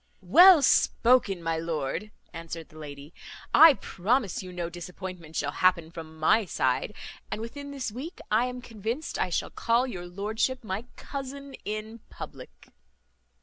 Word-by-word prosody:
"Well 345 - +8
spoken, 235 -8 +3
my 165 0 -1
lord," 165 +4 -3 0.2
answered 165 -1 -7
the 155 - -16
lady; 145 +1 -9 0.4
"I 320 -3 +9
promise 210 +1 -1
you 185 -1 -9
no 175 -1 -3
disappointment 175 -1 -8
shall 145 - -1
happen 170 -1 +2
from 160 -1 -9
my 200 +8 +3
side; 130 +3 -1 0.3
and - - -3
within 285 +6 -7
this 275 -5 -4
week 270 +10 -7
I 220 +3 +4
am 250 0 -6
convinced 230 +7 -4
I 185 - +1
shall 170 - -2
call 235 +2 +1
your 180 -9 -6
lordship 215 +7 -2
my 210 +2 -4
cousin 280 0 -7
in 215 +2 -5
public." - - -11
200 Hz, 145 wpm, -27 LUFS, 170-250 Hz, 0.4 s, I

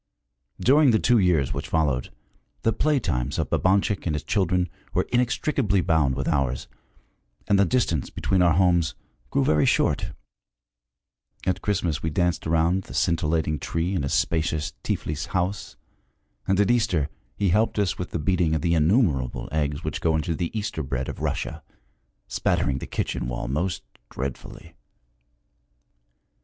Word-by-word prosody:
During 145 +2 +5
the 110 - +5
two 120 -1 +4
years 85 -8 +2
which - - -4
followed, 70 -6 0 0.5
the 115 - +2
play 150 -2 +2
times 65 - -2
of - - -2
Babanchik 95 0 +1
and 75 - 0
his 75 - -3
children 90 -3 +1 0.3
were - - +1
inextricably 120 -3 +1
bound 75 -6 +2
with - - -3
ours, 65 -3 0 0.8
and 100 - +3
the 100 - +5
distance 85 - 0
between 95 -2 0
our 85 -2 +5
homes 85 -3 +3 0.3
grew 135 -1 +1
very 75 - +3
short. - - +1 1.3
At 95 0 0
Christmas 95 -7 -1
we 80 - -1
danced 90 +1 0
around 85 +3 +2
the - - -10
scintillating 80 -2 +1
tree 85 +6 -2
in 90 - 0
his 70 - -1
spacious 80 -1 0
Tiflis 75 -1 -3
house, 90 +3 -2 0.7
and 95 0 +2
at 105 +2 +4
Easter 105 -12 +1 0.3
he 100 - +1
helped 110 +5 +2
us 100 -5 0
with 90 - -4
the - - -3
beating 85 0 +1
of 80 - -2
the 85 - +2
innumerable 75 - +1
eggs 75 -2 -1
which - - -3
go 80 -1 +2
into 80 +2 -1
the 85 +1 -2
Easter 105 -6 -3
bread 65 -2 -3
of - - -7
Russia, - - -3 0.7
spattering 65 -1 0
the - - -7
kitchen - - -2
wall - - -4
most 80 +5 -2 0.3
dreadfully. 65 0 -7
85 Hz, 155 wpm, -25 LUFS, 75-100 Hz, 1.3 s, During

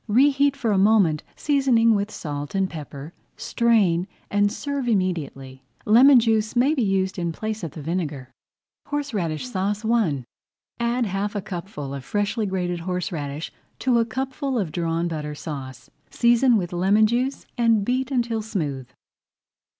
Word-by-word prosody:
Reheat 275 +4 +3
for 235 -5 0
a 195 - +3
moment, 195 -7 +4
seasoning 260 -6 +3
with 205 0 0
salt 145 +1 -6
and 195 -1 +2
pepper, 150 -2 -8 0.2
strain, 200 -7 +2 0.2
and 205 0 +2
serve 280 +2 -3
immediately. 160 - -2 0.2
Lemon 250 +5 +7
juice 220 -1 +1
may 260 +5 +4
be 280 - 0
used 195 -2 0
in 170 -1 -1
place 215 +4 -4
of 160 - -5
the 155 - -8
vinegar. 150 -6 -3 0.6
HORSERADISH 245 - -2
SAUCE 205 0 -2
I 210 - +1 0.6
Add 235 +1 +1
half 200 +1 -2
a 205 - -1
cupful 170 -6 -6
of 140 -2 -6
freshly 205 - -1
grated 180 -2 -2
horseradish 165 -4 -4 0.2
to 250 -2 +2
a 230 - +2
cupful 265 +3 -3
of 190 -8 -1
Drawn 170 0 -1
Butter 150 -2 -4
Sauce. 140 -4 -8 0.2
Season 240 0 +4
with 175 -3 -3
lemon 195 +5 +4
juice 250 +5 -1
and 230 -4 +2
beat 255 +2 0
until 235 -4 0
smooth. 150 - -3
205 Hz, 150 wpm, -23 LUFS, 165-235 Hz, 0.6 s, Lemon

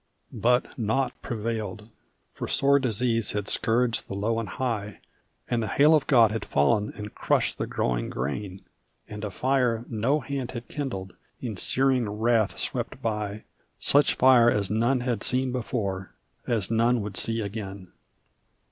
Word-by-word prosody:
But 125 +2 +1
naught 120 +4 0
prevailed, 110 -3 -4 0.5
for - - -5
sore 140 +1 +3
disease 115 -3 0
had 105 -1 -3
scourged 115 0 +1
the 100 - -5
low 110 +3 0
and 115 - -4
high, 110 -5 -3 0.5
And 120 -1 0
the 110 - -2
hail 145 +9 +5
of 155 -3 +3
God 115 -5 +5
had 110 -1 -3
fallen 70 +9 +1
and 105 -1 -7
crushed - - 0
the - - -2
growing - - -1
grain, 90 +9 -4 0.5
And 105 0 -8
a 105 - -2
fire 125 +1 0
no 120 +7 +1
hand 135 -2 -4
had 120 -2 -7
kindled 100 -11 -5 0.3
in 115 -5 -4
searing 130 +2 +1
wrath 110 0 +1
swept - - -3
by 105 -1 -3 0.3
Such 145 +1 +3
fire 125 -2 +6
as 105 -4 0
none 120 +4 +2
had 120 -4 -1
seen 130 0 +1
before 100 -6 -3 0.3
as 110 -4 0
none 115 +1 +3
would 100 -1 -6
see 115 +3 +2
again. 100 -3 -6
115 Hz, 155 wpm, -26 LUFS, 105-125 Hz, 0.5 s, fire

